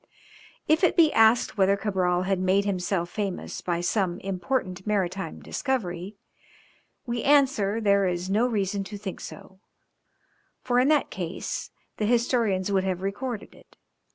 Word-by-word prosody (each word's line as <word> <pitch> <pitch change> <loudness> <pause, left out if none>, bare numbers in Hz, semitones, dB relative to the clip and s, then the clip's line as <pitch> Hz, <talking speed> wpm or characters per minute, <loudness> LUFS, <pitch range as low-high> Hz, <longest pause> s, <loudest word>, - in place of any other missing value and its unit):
If 315 +4 +3
it 360 - +3
be 320 -3 +5
asked 225 0 +4
whether 195 +1 +4
Cabral 185 -3 0
had 190 0 0
made 190 +2 +2
himself 180 -2 -1
famous 200 -4 -4
by 175 -1 -1
some 180 -1 0
important 190 0 -3
maritime 190 -4 -2
discovery, 200 -8 -3 0.9
we 240 -1 -2
answer 260 -8 +3
there 200 -3 +3
is 175 0 -2
no 215 +6 +2
reason 200 -3 -1
to 205 +1 -7
think 200 -2 -6
so, 190 - -11 1.0
for 245 -1 +1
in 255 - +3
that 300 -1 +2
case 175 -2 -4 0.3
the 210 - 0
historians 230 -5 +1
would 190 -1 +2
have 185 -1 -2
recorded 215 +3 -4
it. - - -21
200 Hz, 145 wpm, -26 LUFS, 185-230 Hz, 1.0 s, be